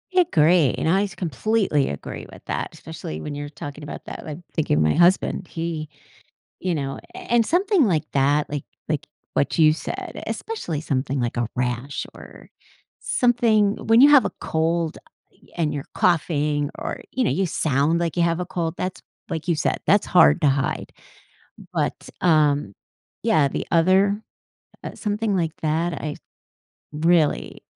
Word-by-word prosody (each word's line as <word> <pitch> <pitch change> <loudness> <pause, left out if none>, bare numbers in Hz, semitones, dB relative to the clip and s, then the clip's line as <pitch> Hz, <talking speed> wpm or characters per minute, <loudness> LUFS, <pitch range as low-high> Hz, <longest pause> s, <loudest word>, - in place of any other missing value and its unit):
I 365 - +7
agree, 165 - +4
and 160 - 0
I 195 +3 +3
s 195 -3 -5
completely 180 - 0
agree 70 - -6
with - - -14
that, - - -3
especially 80 0 -7
when 150 - -5
you're 145 0 -5
talking 145 0 -8
about 145 - -8
that - - -8
like, 155 +1 -6
thinking 145 - +1
of 80 - +3
my 75 - +3
husband, 180 +1 +3
he 165 -2 -4 0.7
you 180 -2 -1
know? 135 -2 -3 0.2
A - - -7
and, 235 -2 +1
something 370 - +3
like 160 -4 0
that, 145 +2 +2
like 145 -1 -3 0.2
like - - -2 0.3
what 70 - 0
you 155 -1 +6
said, 155 - -6
especially 175 - -4
something 135 -3 -1
like 120 0 -2
a 120 -1 0
rash 125 +2 -2
or - - -13 0.5
something 225 -4 +2
when 225 +1 +6
you 280 - +9
have 285 -3 +7
a - - -1
cold, 165 0 -1 0.3
uh, - - -25
and 155 -3 0
you're 145 -1 -4
coughing, 150 -4 +1
or, - - -4
you 255 - 0
know, - - +2
you 195 - +1
sound 155 +1 +1
like 170 -1 -1
you 170 - +4
have 170 0 +1
a 180 - -2
cold, 170 -2 -3
that's 185 0 -4 0.3
like 160 +1 -4
you 170 - +2
said, - - 0
that's - - +4
hard 75 0 +5
to - - +4
hide, 135 0 -1 0.8
but, - - -2
um, 145 - +3 0.5
yeah, 150 -3 +4
the - - -4
other 190 +5 +3 0.6
uh, - - -6
something 210 -1 -1
like 165 -3 0
that, 160 +3 0
I 150 0 -4 0.8
really, 160 0 +1
160 Hz, 170 wpm, -23 LUFS, 145-185 Hz, 0.8 s, you